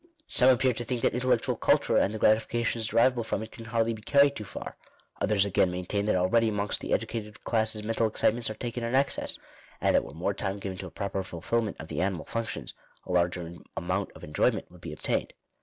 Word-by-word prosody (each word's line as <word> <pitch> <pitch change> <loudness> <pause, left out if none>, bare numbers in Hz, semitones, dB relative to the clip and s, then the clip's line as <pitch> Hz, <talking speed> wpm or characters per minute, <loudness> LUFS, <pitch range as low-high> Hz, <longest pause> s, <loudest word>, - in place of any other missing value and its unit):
Some 125 - +5
appear 130 0 +4
to 120 - -4
think 120 0 -2
that - - +2
intellectual 125 +1 +1
culture - - +2
and 100 - +4
the 110 - -4
gratifications 110 +1 +2
deriveable 120 +2 +3
from 110 - -2
it 110 - -9
can 115 - -10
hardly 115 0 +1
be 110 - -9
carried 140 +5 +4
too 110 - -5
far. - - -7 0.5
Others 100 -2 +3
again 95 -2 +2
maintain 90 +3 -2
that 105 - +3
already 110 +6 +3
amongst 105 -1 -2
the - - -6
edu - - +2
cated 105 -2 -7
classes 110 -2 +1
mental 115 +1 +1
excitements 110 +1 +1
are 110 - -5
taken 120 0 -4
in 115 +2 0
excess; 140 +1 +1 0.4
and - - +2
that - - +4
were 70 - -10
more 90 +5 -1
time 95 0 -2
given 95 -2 -5
to 95 - -5
a - - -9
proper 100 +2 -3
fulfilment 100 +5 -2
of 80 - -7
the 80 0 -3
animal 95 -4 -1
functions, 115 -2 -4 0.3
a - - -6
larger 90 -1 0 0.2
amount - - -1
of - - -14
enjoyment 75 +3 0
would 90 -1 -16
be 85 - -6
obtained. 75 - -2
110 Hz, 220 wpm, -28 LUFS, 95-115 Hz, 0.5 s, Some